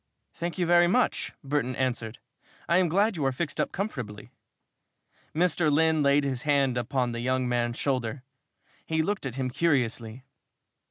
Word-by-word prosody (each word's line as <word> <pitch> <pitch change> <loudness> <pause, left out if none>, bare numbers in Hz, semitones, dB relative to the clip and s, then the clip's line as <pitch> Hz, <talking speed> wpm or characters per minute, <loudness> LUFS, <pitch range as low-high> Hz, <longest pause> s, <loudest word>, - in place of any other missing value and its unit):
"Thank 170 +2 -4
you 180 - +1
very 175 0 +5
much," 245 +7 +1
Burton 135 -2 -1
answered. 120 -3 -2 0.5
"I 170 - +3
am 185 -2 +3
glad 200 +5 +2
you 155 - -2
are 135 - +2
fixed 145 +3 -2
up - - -2
comfortably." 125 - -5 1.0
Mr. 170 -2 +2
Lynn 160 +1 +3
laid 140 0 +4
his 130 -3 -2
hand 140 -4 +2
upon 125 +1 -1
the 120 - -4
young 130 +1 0
man's 120 -1 0
shoulder. 130 -1 -2 0.6
He 160 0 +1
looked 200 -4 -2
at 125 - -6
him 130 -2 -2
curiously. 125 -6 0
140 Hz, 160 wpm, -27 LUFS, 125-165 Hz, 1.0 s, very